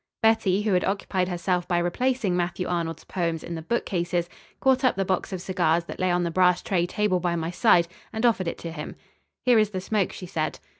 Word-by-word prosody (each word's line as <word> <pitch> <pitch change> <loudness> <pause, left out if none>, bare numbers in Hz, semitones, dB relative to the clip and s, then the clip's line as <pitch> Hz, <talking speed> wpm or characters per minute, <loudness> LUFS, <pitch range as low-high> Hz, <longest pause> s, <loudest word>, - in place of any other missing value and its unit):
Betty, 210 -3 +3
who 210 -2 +1
had 180 - +3
occupied 190 -2 -1
herself 180 0 -1
by 175 - +1
replacing 205 +3 0
Matthew 180 +1 -1
Arnold's 170 -2 -2
poems 165 -3 -2
in 170 - -6
the 165 - -4
bookcase, 175 -3 -1 0.3
caught 265 0 +3
up 255 - +3
the 195 0 0
box 185 +1 -1
of 185 -2 -4
cigars 175 -3 +1
that - - -9
lay 185 0 +1
on 175 0 +2
the 170 - -1
brass 180 0 +3
tray 175 -3 +1
table 200 -1 +1
by 175 -1 0
my 165 0 -2
side, 180 -3 +4 0.2
and 220 +2 -1
offered 210 -7 +2
it - - -3
to 165 - -6
him. 150 -2 -7 0.5
"Here 245 -3 +6
is 215 -1 +3
the 190 -3 -4
smoke," 195 0 0
she 185 - -8
said. 160 -3 -2
180 Hz, 220 wpm, -25 LUFS, 170-200 Hz, 0.5 s, Here